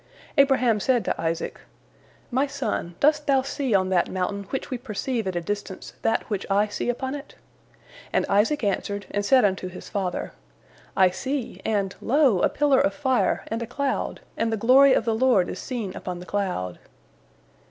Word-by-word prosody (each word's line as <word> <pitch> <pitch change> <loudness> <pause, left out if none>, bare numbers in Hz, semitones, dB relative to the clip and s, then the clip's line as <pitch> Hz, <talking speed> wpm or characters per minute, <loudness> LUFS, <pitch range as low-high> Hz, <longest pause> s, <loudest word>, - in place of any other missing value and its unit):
Abraham 265 -6 +4
said 245 +2 +1
to - - -1
Isaac, 165 0 -3 0.7
"My 265 +4 +2
son, 270 -11 -3
dost 300 0 +3
thou 270 -2 +3
see 275 -4 -1
on 185 -1 +2
that 180 -2 +2
mountain 195 +2 -2
which 270 - -4
we 255 - -2
perceive 230 -1 -3
at 185 - -2
a 175 - 0
distance 200 +1 -5
that 225 - 0
which 205 -3 -2
I 205 +2 +2
see 205 - -3
upon 260 +2 -2
it?" 290 0 -8 0.8
And - - +1
Isaac 225 +8 +2
answered, 200 0 -1
and 205 - -1
said 255 +2 +5
unto 190 -2 0
his 180 0 -10
father, 190 -4 -3 0.7
"I 185 -1 +5
see, 265 +5 -4
and, 200 -3 0
lo, 265 -6 +3
a - - +3
pillar 290 -3 +3
of 290 - +1
fire 260 -3 +1
and 225 +1 -2
a 235 - -4
cloud, 275 +3 -2
and 225 0 0
the 225 - 0
glory 260 +5 +6
of 230 - +1
the 225 - +1
Lord 225 -6 +3
is 185 - -5
seen 225 -7 -4
upon 180 -1 -5
the 180 - -9
cloud." 180 - -2
225 Hz, 185 wpm, -25 LUFS, 195-265 Hz, 0.8 s, glory